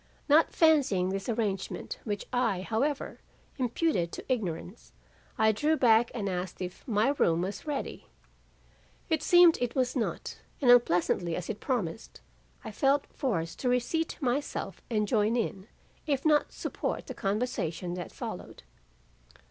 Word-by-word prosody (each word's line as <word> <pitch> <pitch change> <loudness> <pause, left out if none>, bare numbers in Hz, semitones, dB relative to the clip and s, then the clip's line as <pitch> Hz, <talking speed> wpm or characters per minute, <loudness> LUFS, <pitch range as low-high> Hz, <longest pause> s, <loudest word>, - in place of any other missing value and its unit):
Not 310 +2 +5
fancying 275 - +3
this 195 +4 -3
arrangement 210 -4 -2
which 205 -3 -3
I, 245 -7 +1
however, 265 +9 -2 0.4
imputed 245 - 0
to - - -7
ignorance, 190 -2 -5 0.4
I 220 0 +4
drew 300 +9 +1
back 230 -2 +5
and 210 -4 -2
asked 180 -1 -3
if 180 -1 -6
my 220 +1 +2
room 165 +1 +3
was 195 +9 -5
ready. 290 -2 -4 1.0
It 315 -2 +2
seemed 350 0 +6
it 245 -1 -1
was 255 -1 +1
not, 240 - -3 0.2
and 255 -4 +5
unpleasantly 175 -7 +3
as 180 +2 -3
it 210 - -7
promised, 215 - -3 0.4
I - - -6
felt 275 +6 +2
forced 170 - -2
to 250 - 0
reseat 250 +7 0
myself 275 +1 -2
and 210 -3 0
join 215 0 +2
in, 210 -4 -2 0.4
if 280 -1 0
not 300 -1 +3
support, - - -4
the - - -6
conversation 195 -5 -2
that 180 -2 -6
followed. - - -7
225 Hz, 140 wpm, -29 LUFS, 190-270 Hz, 1.0 s, seemed